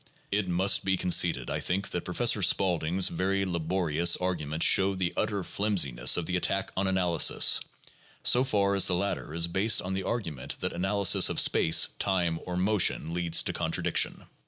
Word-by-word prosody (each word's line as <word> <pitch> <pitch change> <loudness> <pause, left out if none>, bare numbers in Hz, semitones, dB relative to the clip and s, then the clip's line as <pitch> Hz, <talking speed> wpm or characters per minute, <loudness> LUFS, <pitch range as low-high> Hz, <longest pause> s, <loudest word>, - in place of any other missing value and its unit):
It 100 -1 -1
must 90 +3 +2
be 95 0 0
conceded, 85 -8 0
I - - -2
think, 95 +3 -3
that 90 - -4
Professor 105 +3 0
Spaulding 90 -2 +1
's 95 - +3
very 95 +3 -1
la 85 -2 -3
borious 85 0 0
arguments 80 -4 -1
show 95 0 +3
the 90 -2 -2
utter 100 -3 -2
flimsiness 70 - 0
of 85 - -3
the 90 - -3
attack 95 +2 -1
on 95 +1 -1
analysis, 90 -3 +3 0.6
so 125 - +3
far 100 -6 0
as 100 - +4
the 90 - +1
latter 100 -4 -3
is 85 +1 0
based 95 +6 +2
on 95 +1 -4
the 95 - -2
argument 85 - -5
that - - -4
analysis 95 +1 +2
of - - -2
space, 80 - +3
time, 85 -4 -1
or 90 -1 -4
motion 95 -4 0
leads 85 -1 +1
to - - -3
contradiction. - - -1
90 Hz, 180 wpm, -27 LUFS, 85-95 Hz, 0.6 s, as